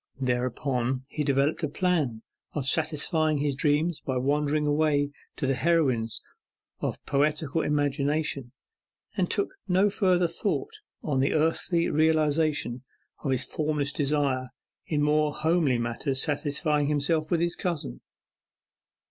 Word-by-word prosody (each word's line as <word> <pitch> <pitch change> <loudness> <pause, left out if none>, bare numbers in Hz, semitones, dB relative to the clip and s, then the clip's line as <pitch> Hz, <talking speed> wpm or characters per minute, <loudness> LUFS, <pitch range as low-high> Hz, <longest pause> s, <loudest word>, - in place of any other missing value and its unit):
Thereupon, 125 0 -1
he 150 - -2
developed 140 +3 +1
a 155 - +1
plan 150 -9 0 0.3
of 145 -4 -2
satisfying 155 +1 +1
his 145 -1 0
dreams 150 +3 +1
by 130 -1 -1
wandering 150 +3 +1
away 145 -1 +2 0.2
to - - -2
the 135 - +2
heroines 130 -6 +1 0.6
of - - -2
poetical 150 +2 +1
imagination, 145 -2 0 0.6
and 180 -2 0
took 200 - 0 0.2
no 190 +2 +3
further 180 -4 +2
thought 170 - -2 0.3
on 145 -4 0
the 135 - +2
earthly 165 +2 +1
realization 155 -4 +2 0.4
of 140 - -3
his 130 -1 +2
formless 150 0 -1
desire, 140 -3 0 0.4
in 150 -2 +1
more 150 0 +2
homely 160 -5 +2
matters 120 +3 -2
satisfying 150 0 0
himself 150 +2 0
with 170 - +2
his 170 +1 0
cousin. 150 - -3
150 Hz, 125 wpm, -27 LUFS, 135-160 Hz, 0.6 s, no